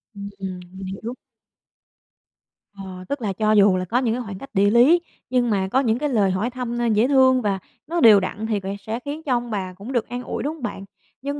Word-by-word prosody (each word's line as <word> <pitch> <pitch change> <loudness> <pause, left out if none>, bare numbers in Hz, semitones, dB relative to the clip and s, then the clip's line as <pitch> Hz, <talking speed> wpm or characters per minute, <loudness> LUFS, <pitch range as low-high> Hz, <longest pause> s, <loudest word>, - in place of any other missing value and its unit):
Ừm, 200 0 -7
ừm, 190 -2 -5
mình 190 0 -8
hiểu. 220 +5 -5 1.6
Ờ, 185 -2 -8
tức 280 -2 -3
là 205 -4 -1
cho 215 +2 +1
dù 205 -2 +5
là 185 - -2
có 230 +7 0
những 245 -3 +1
cái 250 - -3
khoảng 200 -3 -7
cách 275 - -10
địa 200 0 +4
lý 255 +11 +5 0.3
nhưng 250 -2 +2
mà 190 -2 +1
có 265 - +3
những 235 -2 +1
cái 295 - -1
lời 205 -7 +2
hỏi 205 +6 -1
thăm, 245 -1 -4
ơ, 240 - 0
dễ 220 +4 +3
thương 260 -2 +4
và 200 -3 -1 0.3
nó 340 +1 -1
đều 215 -5 +8
đặn 205 +3 -4
thì 215 -2 0
về 195 +1 -5
sẽ 220 +4 -4
khiến 300 +3 -5
cho 275 - -3
ông 240 -1 -5
bà 185 -3 -3
cũng 200 +7 -9
được 240 -3 0
an 245 +1 -5
ủi, - - -4
đúng 295 - -2
hông 315 -5 -13
bạn? 195 -4 -5 0.4
Nhưng 285 +2 -4
225 Hz, 250 wpm, -22 LUFS, 195-255 Hz, 1.6 s, đều